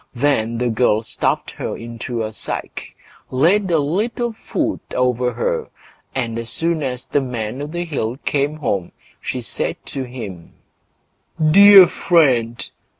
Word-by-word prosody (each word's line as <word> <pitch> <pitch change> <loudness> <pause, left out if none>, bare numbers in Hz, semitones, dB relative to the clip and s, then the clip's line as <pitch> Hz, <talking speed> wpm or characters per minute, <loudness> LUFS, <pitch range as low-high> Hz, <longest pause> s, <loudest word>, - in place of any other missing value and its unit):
Then 120 -4 +1
the 120 0 0
girl 110 -1 +2
stuffed - - -1
her - - -5
into 115 0 -5
a 110 0 -5
sack, - - -6 0.3
laid 180 +9 +2
a 165 - +3
little 215 +10 -1
food 220 - -2 0.2
over 125 -1 +1
her, - - -2 0.5
and 115 -3 -2
as 115 0 -5
soon 165 +3 -1
as 125 -3 -3
the 145 - 0
Man 125 -1 -4
o' 145 - -4
the 175 +3 -4
Hill 130 -7 -3
came 145 +1 0
home, 100 - -2 0.3
she - - -3
said - - -2
to 135 - -5
him: 110 -10 -8 1.0
"Dear 200 +1 +10
friend! 130 -11 +2
130 Hz, 145 wpm, -20 LUFS, 115-165 Hz, 1.0 s, Dear